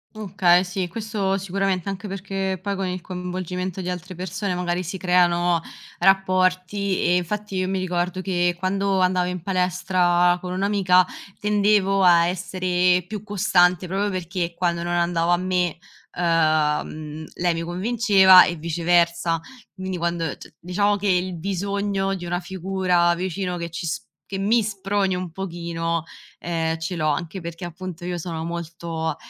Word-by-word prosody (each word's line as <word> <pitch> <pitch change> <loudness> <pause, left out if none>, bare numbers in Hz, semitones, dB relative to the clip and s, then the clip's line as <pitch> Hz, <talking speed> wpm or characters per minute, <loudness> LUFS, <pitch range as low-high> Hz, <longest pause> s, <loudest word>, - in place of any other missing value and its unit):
Okay 185 -4 +3
sì, 180 0 -3
questo 200 0 -2
sicuramente, 195 -1 -1
anche 195 +1 -4
perché 195 -1 -3
poi 200 +2 -3
con 190 -1 -2
il 180 0 -3
coinvolgimento 180 0 -4
di 180 -1 -3
altre 180 +1 -6
persone 185 +2 -3
magari 180 0 -1
si 180 +3 -5
creano 175 -2 +3 0.4
rapporti 185 +1 +2
e 175 - +3
infatti 200 +2 -3
io 185 0 0
mi 190 0 -1
ricordo 180 0 -1
che, 175 -2 0
quando 195 +1 0
andavo 180 -1 +2
in 180 -2 -5
palestra 180 -1 +2
con 180 - -5
un'amica, 185 -1 +3 0.3
tendevo 205 -1 +2
a 175 -2 +6
essere 180 0 +1
più 210 +1 -5
costante 185 -3 +3
proprio 195 +3 -1
perché 175 -2 -3
quando 170 -1 0
non 175 0 -2
andava 170 0 +2
a - - +3
me, 180 -2 0 0.4
uhm, 155 -2 0
lei 175 -1 +1
mi 165 - -3
convinceva 190 +1 +6
e 175 - -2
viceversa, 170 +1 +1 0.4
quindi 185 -1 -4
quando, 170 -1 -1
c - - -13
diciamo 200 +4 +1
che 205 0 -5
il 180 -1 +1
bisogno 195 +2 -1
di 175 -2 -7
una 175 +1 -1
figura 180 -1 +1
vicino 180 +1 -3
che 170 0 -4
ci 165 +1 -5
s 165 - -3 0.2
che 195 - -5
mi 220 +4 +3
sproni 195 -1 -1
un 180 -1 -4
pochino, 170 -2 -3 0.4
ehm, 165 -1 -1
ce 165 +3 -4
l'ho, 155 -2 0
anche 170 +5 -3
perché, 170 +1 -6
appunto, 175 0 -7
io 180 -1 -2
sono 165 -1 -4
molto 165 -1 -4
180 Hz, 155 wpm, -23 LUFS, 175-190 Hz, 0.4 s, a